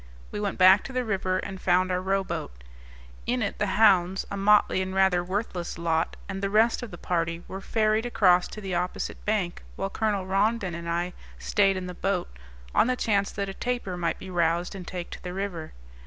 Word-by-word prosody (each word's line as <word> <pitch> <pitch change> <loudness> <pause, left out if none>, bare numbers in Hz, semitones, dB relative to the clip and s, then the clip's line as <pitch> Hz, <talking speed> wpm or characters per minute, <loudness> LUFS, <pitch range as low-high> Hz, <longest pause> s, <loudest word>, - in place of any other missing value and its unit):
We - - -4
went 205 -2 -2
back 190 +2 +7
to 265 - -7
the 255 -1 -1
river, 190 -3 0
and 190 0 -5
found 185 +1 +3
our 180 0 0
rowboat. 190 - -2 0.6
In 245 -1 +1
it 200 - -3
the 210 - +1
hounds 190 -3 +4
a - - -2
motley 200 -1 +4
and 190 0 -3
rather 190 -2 +3
worthless 185 -2 -3
lot 165 -1 0
and 195 -1 -5
the 195 - 0
rest 220 +4 +3
of 245 - -6
the 175 - -9
party 170 0 -2
were 190 - -6
ferried 215 +2 +1
across 180 -6 +4
to 215 - -9
the 190 -2 -4
opposite 180 +1 -3
bank, 205 -5 -1
while 195 0 -3
Colonel 205 -4 0
Rondon 195 0 +1
and 170 0 -5
I 175 +1 -1 0.2
stayed 195 -2 +2
in 185 - -4
the 180 - -6
boat, 180 - -2 0.4
on - - +4
the 255 - +1
chance 200 -5 +1
that 200 -1 -2
a 195 - -5
tapir 240 -5 -3
might 170 -1 -1
be 190 - -9
roused 170 +1 +1
and 185 -3 -8
take 180 -2 -6
to - - -8
the 180 -1 -6
river. 185 -5 -4
190 Hz, 210 wpm, -27 LUFS, 180-205 Hz, 0.6 s, back